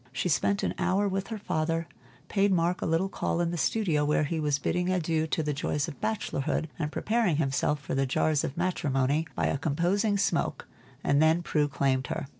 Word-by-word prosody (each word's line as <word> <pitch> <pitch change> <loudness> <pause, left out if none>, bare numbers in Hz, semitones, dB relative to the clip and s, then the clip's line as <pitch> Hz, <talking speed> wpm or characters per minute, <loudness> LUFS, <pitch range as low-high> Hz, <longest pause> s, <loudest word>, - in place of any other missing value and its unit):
She 160 +7 -1
spent 195 +7 +1
an - - 0
hour 190 +3 +2
with 195 0 -2
her 225 - -4
father, 165 -4 -1 0.4
paid 200 +1 +2
Mark 175 0 +1
a - - -1
little 165 +4 +1
call 180 - -2
in 170 -1 +1
the - - -2
studio 170 -4 +1
where 150 +1 +2
he 160 +2 -2
was 150 -2 +1
bidding 180 +5 -1
adieu 160 -3 0
to 160 - -1
the 150 -1 -1
joys 145 0 -1
of 140 - -9
bachelorhood, 160 -7 -1
and 150 -2 -2
preparing 220 -5 +1
himself 145 0 0
for 145 - -5
the 135 0 +1
jars 150 +3 +1
of 135 - -4
matrimony 155 -4 0
by - - 0
a 140 - 0
composing 180 +8 +1
smoke, 175 -6 0 0.4
and 140 +1 +3
then 160 +2 +4
Prue 150 -3 +1
claimed 135 -2 0
her. - - -3
165 Hz, 205 wpm, -28 LUFS, 145-185 Hz, 0.4 s, then